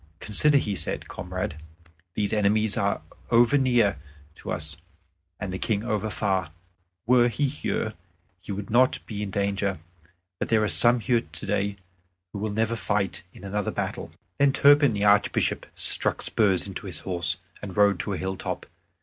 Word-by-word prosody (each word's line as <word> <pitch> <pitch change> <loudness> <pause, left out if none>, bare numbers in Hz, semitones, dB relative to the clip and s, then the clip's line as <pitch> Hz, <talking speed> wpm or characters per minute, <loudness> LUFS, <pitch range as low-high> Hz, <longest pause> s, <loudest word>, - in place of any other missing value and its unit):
"Consider," 145 +7 +2
he 105 -7 -1
said, 95 - -4
"comrade. - - -5 0.6
These 105 -1 -1
enemies 105 0 +2
are 100 0 -1 0.3
over 120 +4 +4
near 120 - +2 0.4
to - - -7
us, 75 +1 -4 0.6
and 95 -2 -4
the 95 - -4
King 105 -2 -1
over 110 -2 -2
far. 95 -4 -1 0.6
Were 120 0 +5
he 140 +5 0
here, 130 -5 -2
we 90 +2 -12
should 100 +1 -7
not 125 +3 +4
be 105 -2 -6
in 105 - -3
danger; 100 -1 -1 0.6
but - - -3
there 110 -1 +3
are - - +1
some 120 +9 +5
here 120 0 +2
today 100 +4 -2 0.6
who 100 - -5
will 110 +1 -2
never 110 +2 -1
fight 100 -3 -1
in - - -15
another 100 0 -2
battle." - - -4 0.3
Then 140 -1 +4
Turpin 145 0 +6
the 100 -1 -2
Archbishop 105 0 +2
struck - - +5
spurs 100 -4 +2
into 100 0 -7
his 85 -5 -5
horse, 85 -4 +2 0.2
and 100 -2 -7
rode 100 -2 +4
to 105 - -2
a - - -3
hilltop. 95 +2 -4
105 Hz, 165 wpm, -25 LUFS, 95-115 Hz, 0.6 s, Turpin